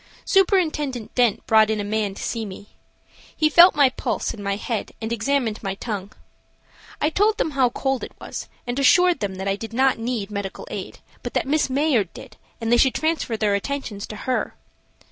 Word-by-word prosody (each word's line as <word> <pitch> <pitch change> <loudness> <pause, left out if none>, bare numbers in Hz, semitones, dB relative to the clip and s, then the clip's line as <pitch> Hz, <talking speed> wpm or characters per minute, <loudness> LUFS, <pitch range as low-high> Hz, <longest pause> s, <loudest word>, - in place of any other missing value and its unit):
Superintendent 310 - +1
Dent 240 -5 +2
brought 220 -1 +5
in 220 -1 0
a - - -1
man 205 -1 -1
to - - -7
see 230 -2 -2
me. 200 0 -9 0.7
He 310 0 +3
felt 345 +3 +8
my 285 -3 +5
pulse 255 - -3
and 205 - -9
my 200 0 -1
head 220 +2 -4
and 225 +1 -3
examined 235 -1 0
my 195 -2 -3
tongue. 205 -2 -5 0.9
I 300 - +1
told 420 +5 +2
them 400 -10 0
how 265 -3 +3
cold 270 +1 -2
it - - -9
was, - - -7 0.2
and 245 +2 -2
assured 355 +4 +5
them 200 -3 -3
that 190 +1 -5
I 195 - +1
did 225 +2 -8
not 260 0 +2
need 225 -3 -3
medical 200 -2 -5
aid, - - -6 0.2
but - - -6
that - - +1
Miss 295 +1 +1
Mayard 260 - +1
did, 245 -5 -11 0.2
and 230 -1 -2
they 240 - +6
should 260 +1 +3
transfer 315 -8 -1
their 210 -2 +1
attentions 210 -1 -3
to 215 - -7
her. 255 +4 -2
235 Hz, 200 wpm, -23 LUFS, 210-280 Hz, 0.9 s, felt